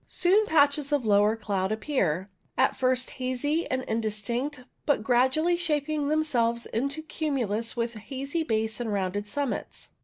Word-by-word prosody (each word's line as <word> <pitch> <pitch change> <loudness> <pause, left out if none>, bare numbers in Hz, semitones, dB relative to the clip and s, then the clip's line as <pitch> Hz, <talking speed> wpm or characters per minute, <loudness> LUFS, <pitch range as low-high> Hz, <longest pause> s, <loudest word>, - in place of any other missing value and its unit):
Soon 400 +4 +3
patches 285 -2 +3
of 285 -5 +1
lower 210 +1 +4
cloud 200 -3 -1
appear, 205 - 0 0.3
at - - +3
first 255 -1 +1
hazy 290 +6 0
and 260 0 -1
indistinct, 230 +5 -2 0.3
but 290 -7 +2
gradually 260 +8 +3
shaping 305 -3 0
themselves 245 -7 +1
into 275 +7 -2
cumulus 245 -9 -2
with 235 0 -1
hazy 275 +8 -4
base 220 -6 -1
and 235 -3 -2
rounded 200 +1 -1
summits. 285 +3 -4
255 Hz, 140 wpm, -27 LUFS, 220-295 Hz, 0.3 s, lower